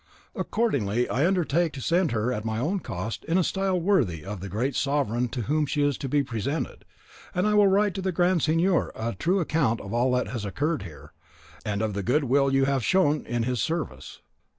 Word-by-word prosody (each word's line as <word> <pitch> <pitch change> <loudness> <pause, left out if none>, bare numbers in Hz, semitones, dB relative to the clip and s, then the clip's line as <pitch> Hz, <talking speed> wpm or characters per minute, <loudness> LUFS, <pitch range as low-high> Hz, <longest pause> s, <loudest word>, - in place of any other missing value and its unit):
Accordingly, 125 - 0
I 140 +7 +2
undertake 175 -3 +1
to 140 - -7
send 170 +4 +1
her 115 +2 0
at 105 - -4
my 110 -1 -2
own 170 - 0
cost 105 - -5
in 165 +2 +1
a 185 - +3
style 190 0 0
worthy 140 - +1
of 100 0 -5
the 100 +2 -6
great 120 +8 -1
sovereign 135 -4 0
to 120 0 -4
whom 150 +4 0
she 145 +1 0
is 145 -1 +2
to 135 - -4
be 145 +1 +2
presented; 130 +4 -4 0.5
and 180 +2 +1
I 210 - +2
will 205 -1 +6
write 200 +1 +3
to 190 - -4
the 190 0 -1
Grand 175 0 +2
Signor 165 +4 +2
a 115 +1 -3
true 175 - +1
account 150 -9 +1
of 100 - -7
all 120 +2 +2
that 125 - 0
has 120 -4 -4
occurred 145 - -1
here, 85 -6 -11 0.5
and 105 0 -2
of 110 -2 -1
the 100 - -2
good 130 +9 +1
will 135 +1 +2
you 135 0 +3
have 135 -2 0
shown 155 -4 +2
in 120 -1 -1
his 125 -1 -1
service." 160 -3 -4
140 Hz, 220 wpm, -26 LUFS, 115-170 Hz, 0.5 s, will